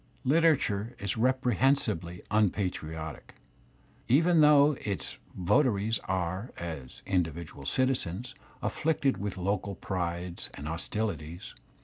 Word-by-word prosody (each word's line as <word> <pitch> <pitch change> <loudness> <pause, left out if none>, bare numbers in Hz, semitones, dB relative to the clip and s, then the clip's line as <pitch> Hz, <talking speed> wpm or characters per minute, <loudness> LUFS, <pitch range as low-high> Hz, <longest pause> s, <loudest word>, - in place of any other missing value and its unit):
Literature 130 -7 +2
is 100 -1 -2
reprehensibly 120 - +1
unpatriotic, 85 -7 -1 0.7
even 165 +6 +5
though 150 -1 +6
its 100 -3 -4 0.2
vota 105 +10 +4
ries 105 +2 -1
are, 95 +4 -2
as 80 -7 -7
individual 85 -6 -2
citizens, 125 -5 0 0.3
afflicted 145 -4 +1
with 100 -1 -4
local 100 +1 -1
prides 85 -1 -3
and 70 - -6
hostilities. 85 0 -3
100 Hz, 95 wpm, -29 LUFS, 85-130 Hz, 0.7 s, though